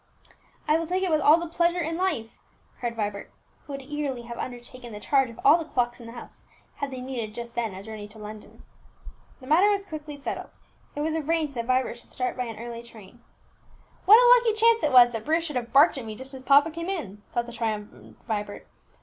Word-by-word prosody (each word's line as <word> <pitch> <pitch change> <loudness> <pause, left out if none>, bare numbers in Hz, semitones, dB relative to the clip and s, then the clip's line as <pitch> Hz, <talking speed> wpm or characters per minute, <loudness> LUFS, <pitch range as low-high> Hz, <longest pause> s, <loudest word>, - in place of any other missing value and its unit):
"I 305 +2 +4
will 330 - -3
take 370 +2 0
it 370 - 0
with 310 -1 +3
all 300 +3 +7
the 340 - -3
pleasure 340 +1 +1
in 330 -1 -2
life!" 330 -12 -2 0.4
cried 240 -1 -3
Vibert, 205 -2 -4 0.3
who 285 - -10
would 275 0 -6
eagerly 280 -3 -4
have 235 0 -8
undertaken 245 0 -7
the 210 - -7
charge 270 +3 +2
of 230 - -12
all 345 - +7
the - - -3
clocks 245 -5 -1
in 235 - -10
the 230 - -9
house 235 - -10 0.3
had 280 - -3
they 260 -1 -7
needed 240 -5 -5
just 235 0 -7
then 225 -5 -2
a 190 - -8
journey 215 -1 -8
to 210 +1 -8
London. 210 0 -11 0.8
The - - -11
matter 335 +9 +5
was 400 -1 0
quickly 305 -4 -7
settled; 280 - -5 0.5
it 295 - -3
was 315 +1 0
arranged 315 -1 0
that 235 -2 -3
Vibert 255 -2 +1
should - - -16
start 250 -1 -2
by 250 - -2
an 225 -2 -7
early 235 +1 -7
train. 235 -1 -14 0.8
"What 425 +3 +10
a - - +7
lucky 450 -2 0
chance 460 0 +5
it 300 - +1
was 245 -1 +8
that 225 -2 -4
Bruce 325 +2 +1
should 300 -4 -6
have 240 -2 -3
barked 280 +1 +5
at 240 - -7
me 215 -1 -6
just 260 +4 -9
as 265 - -8
papa 285 +4 +5
came 335 +3 -5
in!" 210 - -4
thought 240 0 -1
the 235 - -10
triumphant 220 -3 -5
Vibert. 210 -3 -4
255 Hz, 230 wpm, -26 LUFS, 230-315 Hz, 0.8 s, What